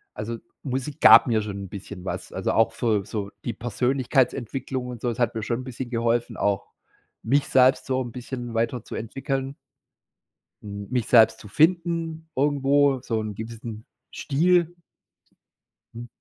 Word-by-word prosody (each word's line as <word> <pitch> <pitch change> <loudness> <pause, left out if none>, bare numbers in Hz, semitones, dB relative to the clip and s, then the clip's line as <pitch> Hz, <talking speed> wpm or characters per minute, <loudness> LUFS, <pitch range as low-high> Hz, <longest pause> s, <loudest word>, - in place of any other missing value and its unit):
also, 115 +2 -4 0.3
Musik 135 +1 -4
gab - - +9
mir 110 -3 +2
schon 100 -1 -5
'n - - -11
bisschen 100 -1 -9
was. - - -5
Also, - - -1
auch 115 - +3
für 110 -5 0
so 100 -2 -4 0.2
die 120 - -2
Persönlichkeitsentwicklung 125 +1 -1
und 125 -1 -7
so. 120 - 0
Es 115 - -7
hat 120 -1 +1
mir 110 - -3
schon 120 +3 -2
'n - - -8
bisschen 130 -1 -6
geholfen, 115 0 0
auch 100 -2 -1 0.5
mich 140 +5 +2
selbst 130 0 +4
so 130 0 0
'n 120 -2 -5
bisschen 120 -1 -6
weiterzuentwickeln 130 +4 -3 1.1
hm, 100 -1 -7
mich 125 -3 -1
selbst 115 -2 +6
zu - - -11
finden 165 - +1
irgendwo, 140 -1 +3
so 115 -3 -2
'n 105 -2 -5
gewissen 110 0 -7 0.3
Stil. 175 +3 +2 1.2
Mhm. 120 +1 -8
120 Hz, 150 wpm, -25 LUFS, 115-135 Hz, 1.2 s, gab